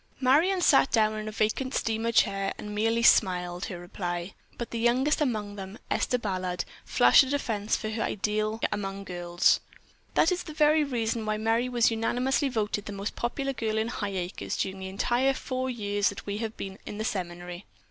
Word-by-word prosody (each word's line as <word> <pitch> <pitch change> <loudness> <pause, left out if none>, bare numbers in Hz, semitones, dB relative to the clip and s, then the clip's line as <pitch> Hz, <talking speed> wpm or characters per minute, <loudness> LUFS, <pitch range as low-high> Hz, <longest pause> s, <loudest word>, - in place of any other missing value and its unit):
Marion 320 +9 +3
sat 275 -5 +5
down 215 -2 +3
in 215 0 -5
a - - -3
vacant 220 +5 -1
steamer 225 +1 0
chair, 195 -3 +2
and 210 0 -7
merely 225 +2 +1
smiled 180 -5 +3
her 180 - -6
reply, 175 0 -5 0.2
but 235 - -5
the 235 - -3
youngest 255 +7 +2
among 210 -7 -1
them, 195 +2 -7
Esther 250 - +1
Ballard, 185 -5 -2 0.2
flashed 125 - +6
a 265 - -1
defense 225 -7 -1
for 215 - -4
her 220 0 -3
ideal 215 +1 -1
among 195 -1 -3
girls. 175 -2 +2 0.6
"That's 360 +2 +3
the 310 - -8
very 305 0 +4
reason 230 -4 -1
why 215 0 -1
Merry 225 +3 +1
was 240 -2 +3
unanimously 250 +5 +1
voted 210 -3 -2
the - - -4
most 200 +1 -4
popular 275 +3 -2
girl 220 -3 -2
in 220 +1 0
Highacres 195 -5 -3
during 190 0 -2
the 190 0 -5
entire 245 +7 +1
four 260 -1 -3
years 205 -4 0
that 200 - -8
we 205 +1 -3
have 225 -1 -4
been 195 0 -6
at 205 - -6
the 215 - -3
seminary. 175 -2 -5
215 Hz, 185 wpm, -28 LUFS, 195-245 Hz, 0.6 s, flashed